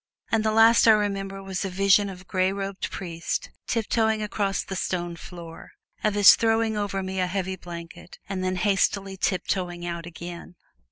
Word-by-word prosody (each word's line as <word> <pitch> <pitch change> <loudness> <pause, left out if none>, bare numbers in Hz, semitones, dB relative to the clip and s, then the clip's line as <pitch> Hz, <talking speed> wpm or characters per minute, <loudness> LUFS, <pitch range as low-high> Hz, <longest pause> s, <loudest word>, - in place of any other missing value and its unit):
And 225 -1 +2
the 220 - +2
last 225 +1 +6
I 220 - +9
remember 195 -2 -1
was 190 -1 -3
a 195 - -2
vision 195 +2 +3
of 185 -1 -9
a - - -15
gray 185 0 +1
robed 195 0 -4
priest 170 -3 -4 0.2
tiptoeing 220 -1 +1
across 200 -2 -1
the 190 - -6
stone 175 -2 -2
floor; 170 -1 -11 0.3
of 215 -1 +1
his 205 -2 +9
throwing 225 -1 +1
over 200 -2 -2
me 190 0 -3
a 180 - +1
heavy 190 0 -2
blanket 170 -1 -10
and 190 -1 -3
then 185 0 0
hastily 195 0 +1
tiptoeing 180 -2 -2
out 170 -1 -5
again. 175 +1 -9
195 Hz, 175 wpm, -25 LUFS, 180-205 Hz, 0.3 s, I